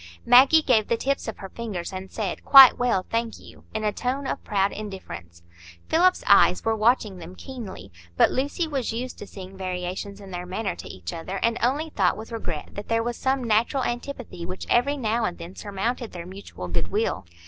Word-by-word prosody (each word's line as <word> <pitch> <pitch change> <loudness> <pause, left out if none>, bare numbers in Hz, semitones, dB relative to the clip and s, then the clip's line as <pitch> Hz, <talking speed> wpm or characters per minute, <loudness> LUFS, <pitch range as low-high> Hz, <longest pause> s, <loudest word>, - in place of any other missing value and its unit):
Maggie 275 +6 +7
gave 225 -7 +3
the 235 - +1
tips 275 +2 -1
of 220 - -5
her 195 - -8
fingers, 200 -6 -5
and 190 +1 -6
said, 205 -5 -4
"Quite 270 -2 +9
well, 235 -7 +1
thank 230 0 -2
you," - - -16
in 215 0 -3
a 210 -1 +1
tone 265 +3 -2
of - - -3
proud 200 -1 +1
indifference. 185 - -8 0.5
Philip's 365 +7 +3
eyes - - +5
were 225 0 +2
watching 215 -3 +2
them 175 +2 -10
keenly; 220 - -9 0.3
but - - +5
Lucy 285 +6 -1
was 270 -7 -2
used 250 +3 -5
to 205 - -8
seeing 190 -1 -10
variations 185 +2 -4
in 195 -2 -11
their 180 0 -5
manner 190 0 -3
to - - -9
each 90 -2 -7
other, 175 +4 -5
and 230 0 +1
only 290 +6 0
thought 190 -8 +1
with 220 +2 -9
regret 175 -9 -5
that 205 - -8
there 230 0 +1
was 240 0 -2
some 265 0 0
natural 235 +4 +2
antipathy 240 -7 -5
which 185 +2 -6
every 280 +5 +3
now 230 -2 0
and 180 -4 -2
then 175 +3 -9
surmounted 220 +4 -3
their 170 -2 -7
mutual 185 - -8
good 85 - -1
will. 205 - -1
215 Hz, 205 wpm, -25 LUFS, 185-245 Hz, 0.5 s, Quite